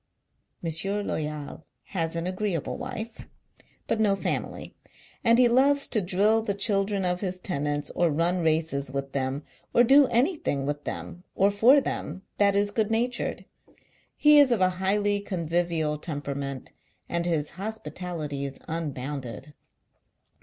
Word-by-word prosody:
" - - -43
M. 195 +6 -1
Loyal 150 0 -4 0.2
has 165 -4 -2
an 165 0 -2
agreeable 185 -3 -2
wife, 245 -3 -6 0.6
but - - -1
no 205 -2 +3
family; 195 - -4 0.5
and 230 -1 +5
he 250 -1 +6
loves 275 +4 +4
to 220 - +3
drill 200 +5 +2
the 205 -3 -2
children 195 -1 +1
of 180 0 0
his 185 -2 -2
tenants, 145 -4 -2
or 175 -1 +2
run 170 +4 +1
races 155 -4 0
with 135 0 -4
them, 135 +1 -2 0.3
or 240 - +7
do 275 +3 +6
anything 240 - 0
with 145 +1 -3
them, 175 - -6
or 195 +1 +4
for 240 +8 +6
them, 195 -7 -4 0.2
that 200 -1 +4
is 205 0 +2
good 215 0 0
natured. 240 +2 -1 0.7
He 300 0 +6
is 280 -3 +6
of 235 - +2
a 185 0 +4
highly 205 +1 +2
convivial 170 -5 -1
temperament, 140 -4 -5 0.4
and 170 0 -1
his 155 -4 -1
hospitality 165 -6 -5
is 135 -1 -6
un 160 -3 -3
bounded. 135 +1 -6
180 Hz, 145 wpm, -26 LUFS, 150-215 Hz, 0.7 s, or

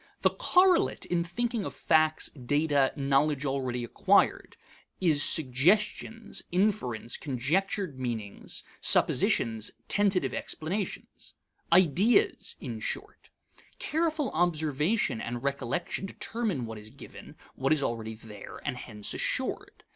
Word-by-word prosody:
The - - +4
correlate 365 -1 +3
in 175 -1 0
thinking 230 +5 -2
of - - -6
facts, 155 -1 +2
data, 145 +1 +1
knowledge 140 +1 +1
already 130 -3 -2
acquired, 120 - +2 0.4
is 160 -6 +3
suggestions, 190 - +1
inferences, 175 - 0
conjectured 150 - -1
meanings, 115 -5 -4 0.2
suppositions, 110 -2 +3 0.2
tentative 200 -3 +1
explanations: 185 +6 -5 0.4
ideas, 185 - +3
in 115 -4 -6
short. - - -5 0.5
Careful 315 -3 -1
observation 155 - +1
and 120 +1 -5
recollection 140 +8 -2
determine 205 - -3
what 110 -1 -7
is 105 +1 -10
given, - - -12 0.2
what 135 +1 -1
is 155 -3 +3
already 110 -2 -3
there, 110 -2 -11
and 135 -4 -2
hence 105 -4 -5
assured. - - -2
150 Hz, 110 wpm, -29 LUFS, 125-195 Hz, 0.5 s, The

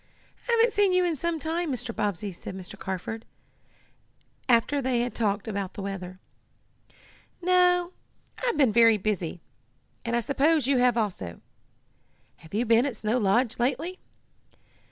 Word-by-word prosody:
"I - - +3
haven't 465 0 +4
seen 405 -2 +3
you 365 0 +3
in 340 -2 0
some 335 +3 -2
time, 325 +1 -2
Mr. 245 -2 -5
Bobbsey," 205 -1 -2
said 185 +1 -8
Mr. 185 -1 -9
Carford, 190 +4 -5 1.3
after 250 +4 +3
they 255 -2 +1
had 245 0 -2
talked 205 -1 -1
about 200 -3 -4
the 200 - -5
weather. 185 -2 -6 1.2
"No, 360 0 +3 0.5
I've 485 -2 +1
been 265 -7 +4
very 230 -1 +6
busy, 185 -5 -2 0.6
and 235 0 -1
I - - +3
suppose 285 +3 +2
you 270 -1 +2
have 245 -1 +3
also. 180 - -3 1.0
Have 160 +5 -11
you 235 +3 +1
been 230 +3 +4
at 265 - -4
Snow 220 +4 0
Lodge 230 +4 +1
lately?" 280 +9 -1
240 Hz, 150 wpm, -27 LUFS, 205-315 Hz, 1.3 s, very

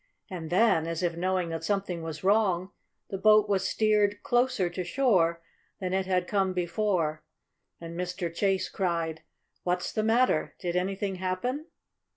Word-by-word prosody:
And 165 -4 -5
then, 180 -3 +3
as 165 +1 -3
if 170 -1 0
knowing 180 0 0
that 165 0 -4
something 195 -2 -1
was 160 0 -6
wrong, 195 -2 +2 0.4
the 195 - -3
boat 215 0 +5
was 200 -2 +1
steered 210 -1 +2
closer 245 -7 +2
to 180 +1 -4
shore 175 -9 +2 0.4
than 185 -2 -3
it 190 0 0
had 180 -1 +1
come 195 -2 +1
before, 175 -4 0 0.6
and 170 0 -8
Mr. 180 -1 -3
Chase 195 +1 +1
cried: 165 -4 -2 0.4
"What's 180 0 -1
the 215 - +1
matter? 225 -5 +2
Did 175 -1 -3
anything 190 +1 -1
happen?" 215 - -2
185 Hz, 155 wpm, -28 LUFS, 170-205 Hz, 0.6 s, boat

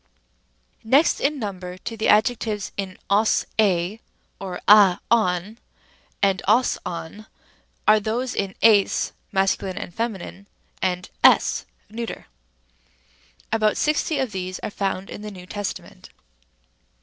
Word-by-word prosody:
Rem. - - -17
a. - - +9
Next 300 +4 +4
in 295 +1 0
number 185 -6 -6
to 225 +4 -6
the 220 - -1
adjectives 215 -2 +1
in 190 -2 -5
os, 210 +2 +2
7 190 0 +2 0.4
or 185 -2 -6
a, 200 -3 +7
ον, 210 -1 +1 0.6
and 195 -1 +2
os, 235 +5 +3
ov, 180 +5 -7 0.6
are 215 0 +6
those 230 +4 -2
in 195 -1 -3
ns 210 -3 +4 0.2
(masc. 195 -1 +1 0.2
and 200 -4 -7
fem.), 200 -3 -5 0.8
es - - +5 0.3
(neut.). 230 +1 -5 1.3
About 215 -1 +2
sixty 305 0 0
of 265 -4 -1
these 185 -1 -4
are - - -3
found 195 -1 -3
in - - -8
the 210 - -6
New 185 -3 -11
Testament. 200 - -7
205 Hz, 125 wpm, -23 LUFS, 190-225 Hz, 1.3 s, a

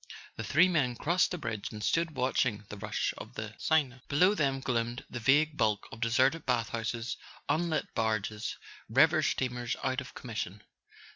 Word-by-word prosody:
The 110 - -5
three 155 - +5
men 145 -9 +1
crossed 175 +8 +2
the 180 - -3
bridge 110 -9 -4
and 105 -1 -7
stood 165 +4 +1
watching 125 -4 +1
the 105 - -7
rush - - -1
of - - -10
the - - -5
Seine. 135 -6 +1
Below 180 +8 +4
them 140 -8 +1
gloomed 120 -2 -2
the 120 - -4
vague 145 +6 +4
bulk 105 -2 +1
of 115 - -9
deserted 130 +7 +3
bath 120 -4 0
houses, 115 0 -3 0.3
unlit 165 0 0
barges, 110 -1 -1 0.3
river 155 +7 +5
steamers 125 -4 -1
out 130 +1 0
of 130 - -11
commission. 105 -4 -5
125 Hz, 165 wpm, -31 LUFS, 115-155 Hz, 0.3 s, three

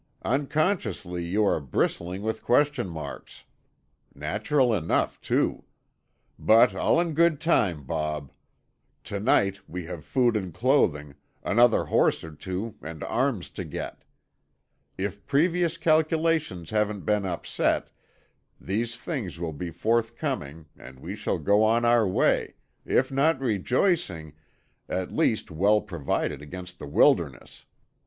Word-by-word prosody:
"Unconsciously 140 - -1
you 100 +5 +1
are 100 - +2
bristling 85 +7 -2
with 110 +1 -2
question 135 -4 +2
marks. 80 -2 -8 0.7
Natural 110 - +1
enough, 85 -6 0
too. - - 0 0.7
But 115 +3 +5
all - - +2
in 170 -2 0
good 165 -1 +3
time, 100 - +1
Bob. 75 -1 -3 0.7
To 100 - -5
night 100 -3 +2
we 90 0 -6
have 85 -3 -7
food 120 - +2
and 95 -4 -2
clothing, 75 - +2 0.3
another 120 +2 +4
horse - - +2
or 80 - -8
two 95 +7 -5
and 80 0 -7
arms 125 -7 -1
to - - -5
get. - - -7 0.9
If 100 +1 -4
previous 170 +3 +2
calculations 155 - +1
haven't 105 -2 0
been 105 -1 +1
upset, 90 -3 -1 0.7
these 115 +4 -2
things 120 - -5
will 85 -2 -3
be 85 +4 -5
forthcoming 115 - -2
and 65 +1 -13
we - - -6
shall - - -2
go 100 +2 +3
on 115 +2 +3
our 120 -3 +4
way—if 125 +7 0
not 140 +2 +2
rejoicing, 110 - 0 0.6
at 90 0 -2
least - - 0
well 100 +6 +3
provided 75 -5 -3
against 90 +4 -9
the 75 - -7
wilderness. 70 - +1
105 Hz, 125 wpm, -26 LUFS, 85-130 Hz, 0.9 s, But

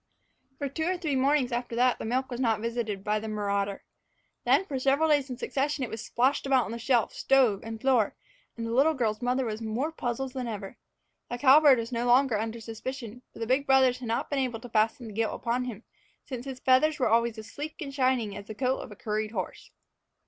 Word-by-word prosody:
For 285 - -2
two 315 +4 -3
or 365 +1 0
three 310 -6 -1
mornings 265 -1 +2
after 240 0 -3
that 250 +1 +3
the - - -5
milk 255 +3 -1
was 245 - -4
not 225 -4 +2
visited 225 -3 -3
by 210 +1 0
the 220 - -6
marauder. 200 -2 -2 0.6
Then 390 - +4
for 275 -7 -3
several 275 +4 +2
days 285 -3 +2
in 250 - -5
succession 275 +2 -1
it 245 - -4
was 220 0 -5
splashed 265 +3 +1
about 265 -3 +3
on 230 - -5
shelf, 240 -2 +1
stove, 255 -7 +3
and 225 0 -7
floor, 245 -4 +2 0.4
and 230 - -4
the 230 - -3
little 285 +6 +4
girl's 220 -4 -1
mother 250 +1 0
was 220 -1 -4
more 230 +8 -2
puzzled 255 -3 -3
than 255 -2 -4
ever. 210 0 -6 0.5
The 245 - -3
cowbird 280 +1 +7
was 230 +1 -4
no 240 0 -1
longer 245 -2 +4
under 225 +1 -3
suspicion, 230 +1 -7
for - - -15
the 230 - -3
big 260 +4 +1
brothers 260 -2 +4
had 250 - -6
not 230 +5 -2
been 285 - +1
able 250 -4 -1
to 245 - -9
fasten 225 +3 +1
the 220 - -8
guilt 225 +1 -1
upon 245 +2 -1
him, 235 -3 -7 0.4
since 255 -2 -6
his 265 -2 -6
feathers 300 +5 +3
were 260 - +2
always 230 0 +2
as 220 0 -9
sleek 300 +2 -6
and 280 -4 -6
shining 255 -6 +1
as 205 0 -8
the 215 - -7
coat 260 +2 0
of 240 - -8
a - - -9
curried 215 0 -2
horse. - - -5
245 Hz, 230 wpm, -28 LUFS, 225-270 Hz, 0.6 s, cowbird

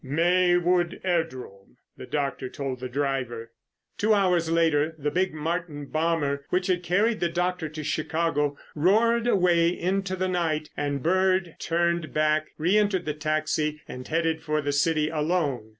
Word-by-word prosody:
"Maywood 175 +3 +2
airdrome," 130 - -3 0.2
the - - -10
doctor 140 -3 -2
told 135 -2 -5
the 130 0 -5
driver. 125 -4 -3 0.5
Two 215 +1 +3
hours 180 -4 +2
later 160 -1 +2
the 150 0 -2
big 185 +1 +1
Martin 155 -1 -3
bomber 155 -2 -1
which 180 0 0
had 180 -1 +1
carried 205 +6 +1
the 175 - 0
doctor 180 -1 -1
to 155 0 -7
Chicago 150 -2 -1 0.2
roared 225 +9 +3
away 180 -6 +3
into 185 +2 -1
the 185 0 -1
night, 165 -4 -1
and 145 -2 -2
Bird 185 0 +2
turned 170 -1 -1
back, 155 0 +2
reentered 190 +2 +2
the 150 - -1
taxi, 155 0 -1
and 125 0 -8
headed 165 0 0
for 155 -1 -1
the 145 -1 -1
city 150 +1 +2
alone. 150 -7 -1
165 Hz, 150 wpm, -26 LUFS, 150-180 Hz, 0.5 s, Two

